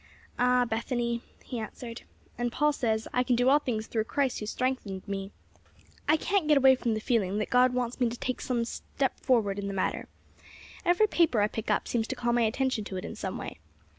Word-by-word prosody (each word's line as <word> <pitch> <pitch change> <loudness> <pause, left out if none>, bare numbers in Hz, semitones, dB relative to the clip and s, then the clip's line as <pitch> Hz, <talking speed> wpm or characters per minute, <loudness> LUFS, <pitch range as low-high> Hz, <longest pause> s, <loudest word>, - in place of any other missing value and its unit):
'" - - -23
"Ah, 250 0 +4
Bethany," 235 +1 -1 0.2
he 245 - -4
answered, 230 +1 -7 0.3
"and 240 0 -1
Paul 300 +4 +2
says: 225 -5 0
'I 250 - +3
can 250 0 +2
do 245 +2 +3
all 290 +2 +6
things 225 -6 -2
through 220 -1 -1
Christ 270 +1 0
who 210 - -5
strengthened 225 -6 -2
me.' 195 -1 -3 0.8
I 310 - +6
can't 385 0 0
get 300 -1 +5
away 265 -1 +7
from 240 -3 0
the - - -1
feeling 210 -4 0
that 210 - -2
God 250 0 +4
wants 245 0 -2
me 245 -2 +3
to 240 - -6
take 255 +1 -3
some 240 -2 0 0.6
forward 215 -6 +2
step - - -2
in 200 - -4
the 200 - -4
matter. 190 - -1 0.8
Every 355 +4 +4
paper 335 - +2
I 205 - +4
pick 220 0 -5
up - - +1
seems 225 -2 0
to - - -3
call 240 0 0
my 240 - +3
attention 235 +1 +1
to 190 - -5
it 185 - -5
in - - -6
some - - -4
way. - - -7
240 Hz, 225 wpm, -29 LUFS, 220-255 Hz, 0.8 s, away